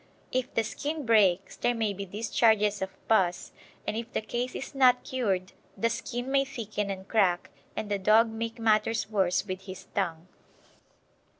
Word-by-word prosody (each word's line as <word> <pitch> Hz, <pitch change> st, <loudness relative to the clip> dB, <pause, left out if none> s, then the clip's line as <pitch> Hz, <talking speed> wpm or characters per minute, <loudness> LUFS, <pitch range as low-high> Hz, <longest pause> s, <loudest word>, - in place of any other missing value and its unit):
If 255 Hz, 0 st, -1 dB
the 225 Hz, -, +3 dB
skin 290 Hz, +7 st, -4 dB
breaks 195 Hz, -5 st, +3 dB
there 245 Hz, -, +1 dB
may 220 Hz, -3 st, 0 dB
be 200 Hz, 0 st, -6 dB
discharges 210 Hz, 0 st, +2 dB
of 190 Hz, -, -1 dB, 0.2 s
pus, 185 Hz, -5 st, +2 dB, 0.3 s
and 210 Hz, -, -2 dB
if 230 Hz, +1 st, -4 dB
the -, -, 0 dB
case 240 Hz, +3 st, -3 dB
is 270 Hz, -, -6 dB
not 255 Hz, -2 st, +5 dB
cured 195 Hz, -8 st, -1 dB, 0.3 s
the 230 Hz, +4 st, +1 dB
skin 245 Hz, +2 st, -4 dB
may 275 Hz, 0 st, +4 dB
thicken 215 Hz, -6 st, -4 dB
and 190 Hz, 0 st, -5 dB
crack, 185 Hz, -6 st, +2 dB, 0.2 s
and 215 Hz, -, -3 dB
the 200 Hz, -, +1 dB
dog 215 Hz, +4 st, +5 dB
make 230 Hz, +1 st, -4 dB
matters 220 Hz, -1 st, +1 dB
worse 190 Hz, -3 st, +2 dB
with 185 Hz, -1 st, -5 dB
his 185 Hz, 0 st, -8 dB
tongue. 170 Hz, -3 st, -2 dB
215 Hz, 170 wpm, -28 LUFS, 195-235 Hz, 0.3 s, not